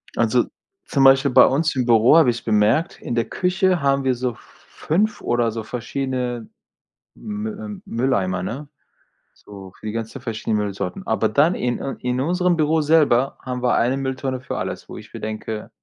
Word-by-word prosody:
Also, -, -, +2 dB, 0.4 s
zum 140 Hz, -, +1 dB
Beispiel 135 Hz, 0 st, +6 dB
bei -, -, +8 dB
uns 155 Hz, +3 st, +1 dB
im 125 Hz, -2 st, 0 dB
Büro 120 Hz, +6 st, +5 dB
habe 155 Hz, -6 st, +6 dB
ich 115 Hz, -, -7 dB
bemerkt, 110 Hz, +9 st, +1 dB
in 120 Hz, -, -4 dB
der 115 Hz, -1 st, +1 dB
Küche 185 Hz, -2 st, +1 dB
haben 140 Hz, 0 st, +2 dB
wir 130 Hz, -1 st, +1 dB
so 125 Hz, -1 st, -3 dB
5 205 Hz, +8 st, -3 dB
oder 120 Hz, -1 st, +1 dB
so 110 Hz, 0 st, -5 dB
verschiedene 125 Hz, 0 st, -4 dB, 0.7 s
Mü 215 Hz, 0 st, -5 dB
äh, 210 Hz, -1 st, -8 dB
Mülleimer, 100 Hz, -7 st, 0 dB
ne, 130 Hz, +10 st, -5 dB, 0.7 s
so 95 Hz, -2 st, -12 dB
für -, -, -13 dB
die 105 Hz, -, -2 dB
ganzen 115 Hz, +4 st, -5 dB
verschiedenen 110 Hz, -3 st, -2 dB
Müllsorten. 105 Hz, -, -4 dB
Aber 110 Hz, 0 st, +1 dB
dann 145 Hz, -, +3 dB
in 120 Hz, -5 st, -2 dB
äh, 135 Hz, -, -4 dB
in 125 Hz, 0 st, -2 dB
unserem 180 Hz, +2 st, +1 dB
Büro 155 Hz, +1 st, +2 dB
selber 145 Hz, -4 st, +3 dB
haben 125 Hz, -1 st, -5 dB
wir 125 Hz, -, +2 dB
1 125 Hz, +3 st, +1 dB
Mülltonne 130 Hz, -1 st, -3 dB
für 130 Hz, -, -5 dB
alles, -, -, -5 dB
wo -, -, -8 dB
ich -, -, -13 dB
mir -, -, -7 dB
denke: 110 Hz, 0 st, -5 dB
130 Hz, 180 wpm, -21 LUFS, 115-150 Hz, 0.7 s, bei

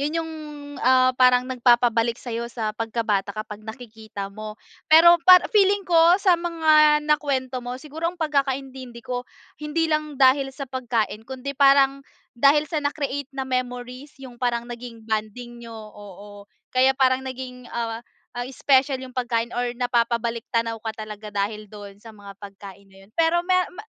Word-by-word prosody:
yun 300 Hz, +3 st, -2 dB
yung 325 Hz, -1 st, -3 dB, 0.5 s
ah 255 Hz, 0 st, +4 dB
parang 250 Hz, 0 st, +4 dB
nagpapabalik 240 Hz, -2 st, +2 dB
sayo 235 Hz, -1 st, -5 dB
sa 220 Hz, -3 st, -4 dB
pagka 225 Hz, +1 st, -3 dB
bata 200 Hz, -1 st, -1 dB
kapag 215 Hz, -1 st, -7 dB
nakikita 220 Hz, -3 st, -9 dB
mo. 215 Hz, +1 st, -8 dB, 0.3 s
Pero 335 Hz, +2 st, +7 dB
para 365 Hz, -1 st, +9 dB
feeling 400 Hz, -1 st, +3 dB
ko 340 Hz, 0 st, +5 dB
sa 370 Hz, -4 st, +2 dB
mga 310 Hz, -3 st, +3 dB
nakuwento 270 Hz, -4 st, -1 dB
mo 245 Hz, +1 st, -6 dB
siguro 310 Hz, +4 st, -4 dB
ang 350 Hz, -, -8 dB
pagkakaintindi 270 Hz, -5 st, -3 dB
ko 245 Hz, -1 st, -5 dB, 0.3 s
hindi 300 Hz, +2 st, -1 dB
lang 305 Hz, -2 st, -2 dB
dahil 270 Hz, +1 st, +4 dB
sa 275 Hz, -, -5 dB
pagkain 240 Hz, -5 st, -2 dB
kundi 265 Hz, +1 st, -6 dB
parang 275 Hz, 0 st, +4 dB, 0.3 s
dahil 280 Hz, +5 st, +4 dB
sa 305 Hz, 0 st, -3 dB
na-create 285 Hz, -1 st, -3 dB
na 265 Hz, -, -2 dB
memories. 255 Hz, +1 st, -5 dB
Yung 245 Hz, -2 st, -13 dB
parang 235 Hz, -1 st, -1 dB
naging 240 Hz, -2 st, -10 dB
bonding 225 Hz, +2 st, -4 dB
niyo, 230 Hz, -1 st, -10 dB
oo. 205 Hz, -1 st, -12 dB, 0.2 s
Kaya 260 Hz, +1 st, +3 dB
parang 260 Hz, -1 st, +3 dB
naging 250 Hz, -1 st, -8 dB
ah 230 Hz, -1 st, -4 dB, 0.3 s
ah 245 Hz, 0 st, -5 dB
special 265 Hz, -1 st, +2 dB
yung 260 Hz, -, -9 dB
pagkain 240 Hz, -2 st, -2 dB
or 245 Hz, 0 st, -3 dB
napapabalik-tanaw 235 Hz, -1 st, -1 dB
ka 220 Hz, 0 st, -6 dB
talaga 210 Hz, -1 st, -9 dB
dahil 210 Hz, +1 st, -3 dB
doon 205 Hz, -1 st, -12 dB
sa 225 Hz, +1 st, -14 dB
mga 200 Hz, -1 st, -12 dB
pagkain 200 Hz, -1 st, -12 dB
na 195 Hz, 0 st, -21 dB
yun. 195 Hz, -, -24 dB
Pero 330 Hz, +1 st, +3 dB
mero 365 Hz, 0 st, +1 dB
ma 425 Hz, -, -9 dB
250 Hz, 160 wpm, -23 LUFS, 225-280 Hz, 0.5 s, para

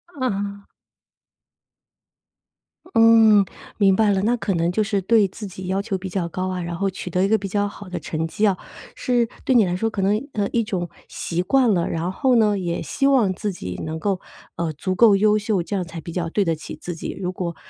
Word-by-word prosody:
嗯。 200 Hz, -6 st, -3 dB, 2.3 s
嗯， 225 Hz, -3 st, +6 dB, 0.3 s
明 195 Hz, -2 st, +4 dB
白 215 Hz, 0 st, +3 dB
了。 195 Hz, -1 st, +1 dB
那 235 Hz, +3 st, +2 dB
可 205 Hz, -3 st, -1 dB
能 170 Hz, 0 st, +1 dB
就 215 Hz, +4 st, +1 dB
是 205 Hz, -1 st, -1 dB
对 210 Hz, +1 st, +4 dB
自 205 Hz, +3 st, -9 dB
己 185 Hz, -1 st, -8 dB
要 190 Hz, +1 st, 0 dB
求 200 Hz, -2 st, -2 dB
比 190 Hz, +1 st, -6 dB
较 180 Hz, -1 st, -2 dB
高 185 Hz, +2 st, -3 dB
啊， 185 Hz, -1 st, -3 dB
然 170 Hz, 0 st, -4 dB
后 195 Hz, +3 st, 0 dB
取 185 Hz, -1 st, -7 dB
得 180 Hz, +2 st, +1 dB
一 -, -, +3 dB
个 220 Hz, +2 st, +3 dB
比 200 Hz, -1 st, -5 dB
较 205 Hz, +1 st, 0 dB
好 205 Hz, -1 st, -10 dB
的 180 Hz, -, -4 dB
成 160 Hz, 0 st, -3 dB
绩 210 Hz, +6 st, 0 dB
哦， 190 Hz, -3 st, +1 dB, 0.4 s
是 245 Hz, -3 st, +1 dB, 0.2 s
对 260 Hz, -, +2 dB
你 225 Hz, -4 st, +6 dB
来 175 Hz, -1 st, -1 dB
说 225 Hz, +5 st, 0 dB
可 210 Hz, -3 st, -3 dB
能 210 Hz, +7 st, +1 dB
呃， 205 Hz, -2 st, 0 dB
一 230 Hz, -, +1 dB
种 180 Hz, -5 st, -3 dB, 0.2 s
习 170 Hz, +1 st, -2 dB
惯 245 Hz, +4 st, +3 dB
了。 175 Hz, -3 st, +1 dB
然 165 Hz, +2 st, -2 dB
后 255 Hz, +5 st, +2 dB
呢 210 Hz, -3 st, +3 dB
也 175 Hz, -3 st, -2 dB
希 275 Hz, -, 0 dB
望 245 Hz, -9 st, +3 dB
自 205 Hz, +2 st, -3 dB
己 90 Hz, -, -6 dB
能 160 Hz, 0 st, -4 dB
够， 195 Hz, +1 st, -1 dB, 0.3 s
呃， 165 Hz, -1 st, -2 dB
足 185 Hz, +5 st, -3 dB
够 220 Hz, 0 st, +6 dB
优 210 Hz, +1 st, +4 dB
秀， 210 Hz, -3 st, 0 dB
这 200 Hz, -, -4 dB
样 190 Hz, -, 0 dB
才 165 Hz, -1 st, -8 dB
比 170 Hz, -, -8 dB
较 170 Hz, -1 st, -2 dB
对 200 Hz, +4 st, +1 dB
得 165 Hz, -1 st, +1 dB
起 155 Hz, -, -8 dB
自 175 Hz, -, -5 dB
己。 165 Hz, -, -5 dB
如 180 Hz, -1 st, -2 dB
果， 175 Hz, -2 st, -4 dB
195 Hz, 245 characters per minute, -22 LUFS, 180-215 Hz, 2.3 s, 嗯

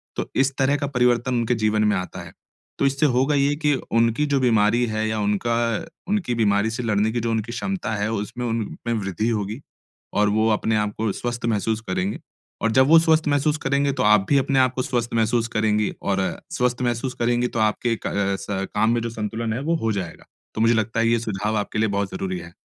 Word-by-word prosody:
तो -, -, -4 dB
इस 135 Hz, 0 st, +2 dB
तरह 135 Hz, +1 st, +2 dB
का 140 Hz, -1 st, -2 dB
परिवर्तन 125 Hz, -1 st, +1 dB
उनके 120 Hz, +1 st, +1 dB
जीवन 110 Hz, -1 st, +1 dB
में 105 Hz, -1 st, +2 dB
आता 90 Hz, 0 st, -5 dB
है, -, -, -11 dB, 0.5 s
तो -, -, +2 dB
इससे 140 Hz, +2 st, +2 dB
होगा 135 Hz, +4 st, +2 dB
ये 140 Hz, +1 st, +2 dB
कि 150 Hz, -1 st, +1 dB, 0.2 s
उनकी 115 Hz, +5 st, +2 dB
जो 140 Hz, -2 st, +1 dB
बीमारी 115 Hz, -1 st, +3 dB
है 110 Hz, 0 st, -1 dB
या 110 Hz, 0 st, -1 dB
उनका 105 Hz, +3 st, 0 dB, 0.5 s
उनकी 190 Hz, -11 st, 0 dB
बीमारी 105 Hz, -1 st, +2 dB
से 115 Hz, +2 st, -4 dB
लड़ने 110 Hz, -1 st, +1 dB
की 120 Hz, -, -1 dB
जो 115 Hz, 0 st, -1 dB
उनकी 110 Hz, +1 st, -2 dB
क्षमता 150 Hz, -, -3 dB
है, 105 Hz, +1 st, -1 dB
उसमें 110 Hz, +3 st, -4 dB
उनमें 115 Hz, 0 st, -3 dB
वृद्धि 100 Hz, +3 st, -2 dB
होगी, 110 Hz, +3 st, -3 dB, 0.5 s
और 105 Hz, 0 st, +3 dB
वो 110 Hz, +2 st, +2 dB
अपने 110 Hz, +1 st, 0 dB
आपको 105 Hz, 0 st, -1 dB
स्वस्थ 120 Hz, +1 st, -4 dB
महसूस 110 Hz, 0 st, 0 dB
करेंगे। 95 Hz, +2 st, -1 dB, 0.4 s
और 115 Hz, -, +1 dB
जब 130 Hz, +3 st, +4 dB
वो 165 Hz, +1 st, +8 dB
स्वस्थ 160 Hz, -1 st, +2 dB
महसूस 145 Hz, +1 st, +2 dB
करेंगे, 140 Hz, +1 st, +2 dB
तो 130 Hz, -2 st, -1 dB
आप 105 Hz, -2 st, +5 dB
भी 140 Hz, -, +4 dB
अपने 135 Hz, 0 st, +2 dB
आपको 130 Hz, 0 st, +2 dB
स्वस्थ 120 Hz, -3 st, -2 dB
महसूस 115 Hz, +1 st, +1 dB
करेंगी 105 Hz, -1 st, +1 dB
और 95 Hz, -1 st, 0 dB, 0.4 s
स्वस्थ 125 Hz, 0 st, 0 dB
महसूस 120 Hz, +1 st, -1 dB
करेंगी 120 Hz, +1 st, +2 dB
तो 115 Hz, -, -4 dB
आपके 110 Hz, +2 st, +1 dB
क -, -, +1 dB
अ, 100 Hz, -1 st, 0 dB
स 95 Hz, -1 st, -3 dB
काम 110 Hz, +2 st, +3 dB
में 120 Hz, 0 st, +1 dB
जो 115 Hz, -, -3 dB
संतुलन 110 Hz, 0 st, -3 dB
है, 115 Hz, -, -2 dB
वो 165 Hz, +3 st, 0 dB
हो 110 Hz, -, +2 dB
जाएगा। 95 Hz, -5 st, -5 dB, 0.3 s
तो 110 Hz, -, -1 dB
मुझे 115 Hz, +1 st, +4 dB
लगता 110 Hz, 0 st, 0 dB
है 115 Hz, -, +3 dB
ये 115 Hz, 0 st, +3 dB
सुझाव 105 Hz, -1 st, -2 dB
आपके 105 Hz, +1 st, -2 dB
लिए 110 Hz, 0 st, +2 dB
बहुत 100 Hz, -1 st, -1 dB
ज़रूरी 95 Hz, -1 st, -3 dB
है। 85 Hz, 0 st, -11 dB
115 Hz, 220 wpm, -23 LUFS, 105-125 Hz, 0.5 s, वो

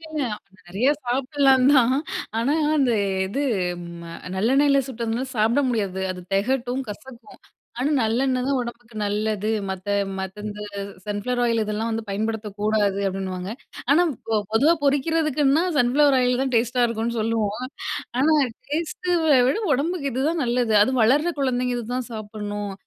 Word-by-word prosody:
இல்ல, 330 Hz, -, -13 dB
இல்ல. 300 Hz, -4 st, -1 dB, 0.4 s
நிறையா 220 Hz, +11 st, +2 dB
சாப்பிடலாம் 265 Hz, +1 st, +3 dB
தான். 255 Hz, -1 st, +5 dB, 0.4 s
ஆனா, 240 Hz, +5 st, +1 dB, 0.2 s
அந்த 260 Hz, -4 st, +3 dB, 0.3 s
இது 275 Hz, +9 st, -2 dB, 0.6 s
ம 170 Hz, 0 st, -9 dB, 0.2 s
நல்லெண்ணெயில 275 Hz, +7 st, +3 dB
சுட்டதுனா 235 Hz, 0 st, -2 dB
சாப்பிட 225 Hz, +6 st, +3 dB
முடியாது. 200 Hz, -5 st, -1 dB
அது 180 Hz, -, -9 dB
தெகட்டும், 250 Hz, +4 st, 0 dB
கசக்கும். 240 Hz, +3 st, -12 dB, 0.4 s
ஆனா 275 Hz, +4 st, 0 dB
நல்லெண்ணெய் 250 Hz, +3 st, +1 dB
தான் 275 Hz, -1 st, +1 dB
உடம்புக்கு 235 Hz, -1 st, -8 dB
நல்லது. 210 Hz, 0 st, -1 dB, 0.2 s
மத்த 190 Hz, +1 st, -5 dB, 0.3 s
மத்த 190 Hz, +2 st, -6 dB
இந்த 210 Hz, 0 st, -6 dB, 0.4 s
சன்ஃப்ளவர் 210 Hz, +4 st, -2 dB
ஆயில் 230 Hz, -2 st, +2 dB
இதெல்லாம் 215 Hz, +2 st, -2 dB
வந்து 225 Hz, 0 st, -2 dB
பயன்படுத்தக் 210 Hz, 0 st, -3 dB
கூடாது 210 Hz, -2 st, +1 dB
அப்படின்னுவாங்க. 190 Hz, -1 st, -4 dB, 0.4 s
ஆனா 315 Hz, +5 st, +6 dB, 0.2 s
பொ 225 Hz, -, -3 dB, 0.2 s
பொதுவா 290 Hz, +10 st, +5 dB
பொறிக்கிறதுக்குன்னா 295 Hz, +1 st, +2 dB, 0.2 s
சன்ஃப்ளவர் 275 Hz, +3 st, +4 dB
ஆயில் 250 Hz, 0 st, +2 dB
தான் 265 Hz, -1 st, -2 dB
டேஸ்ட்டா 245 Hz, +2 st, +2 dB
இருக்கும்னு 230 Hz, 0 st, -2 dB
சொல்லுவோம். 225 Hz, +1 st, -1 dB, 0.5 s
ஆனா 310 Hz, +3 st, +4 dB, 0.4 s
டேஸ்ட்ட 340 Hz, +3 st, -1 dB, 0.3 s
விட 275 Hz, -, +1 dB, 0.2 s
உடம்புக்கு 290 Hz, 0 st, -1 dB
இதுதான் 300 Hz, +6 st, 0 dB
நல்லது. 240 Hz, -2 st, +1 dB
அதுவும் 260 Hz, +2 st, +1 dB
வளர்ற 295 Hz, +10 st, +3 dB
குழந்தைங்க 250 Hz, -2 st, 0 dB
இதுதான் 245 Hz, +2 st, -4 dB
சாப்பிட்ணும். 205 Hz, -1 st, -5 dB
240 Hz, 135 wpm, -23 LUFS, 215-270 Hz, 0.6 s, ஆனா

